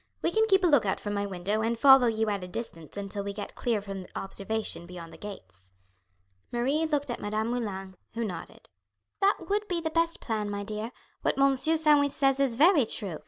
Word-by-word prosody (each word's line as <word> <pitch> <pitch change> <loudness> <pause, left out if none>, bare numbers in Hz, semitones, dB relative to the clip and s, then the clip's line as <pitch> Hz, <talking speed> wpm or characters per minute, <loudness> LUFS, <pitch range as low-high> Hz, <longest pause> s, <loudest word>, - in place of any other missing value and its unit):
We 335 - +2
can 440 +4 +3
keep 385 -2 +4
a - - +5
look 290 -7 +5
out 195 - -1
from 205 - -4
my 200 0 -1
window 195 +3 -2
and 230 +1 0
follow 265 0 +7
you 220 -1 0
at 200 -2 -3
a - - -6
distance 180 -4 -7
until 200 0 -4
we 200 0 -4
get 205 0 -6
clear 230 -4 -1
from 195 -2 -7
observation 195 -2 -3
beyond 175 -2 -9
the - - -11
gates." 95 - -11 0.8
Marie 275 +7 +1
looked 290 -4 -1
at - - -4
Madame 215 +2 -2
Moulin, 195 -6 -4 0.2
who 230 - -1
nodded. 180 -5 -8 0.5
"That 400 +1 +2
would 415 +1 0
be 355 -4 0
the 320 -1 -3
best 335 +1 +2
plan, 215 -3 -2
my 205 0 -3
dear. 215 +2 -5 0.3
What - - 0
Monsieur 275 +4 +3
Sandwith 295 -3 +4
says 270 -1 +2
is 270 -4 +2
very 300 - +5
true. 185 -8 -3
225 Hz, 210 wpm, -28 LUFS, 200-285 Hz, 0.8 s, follow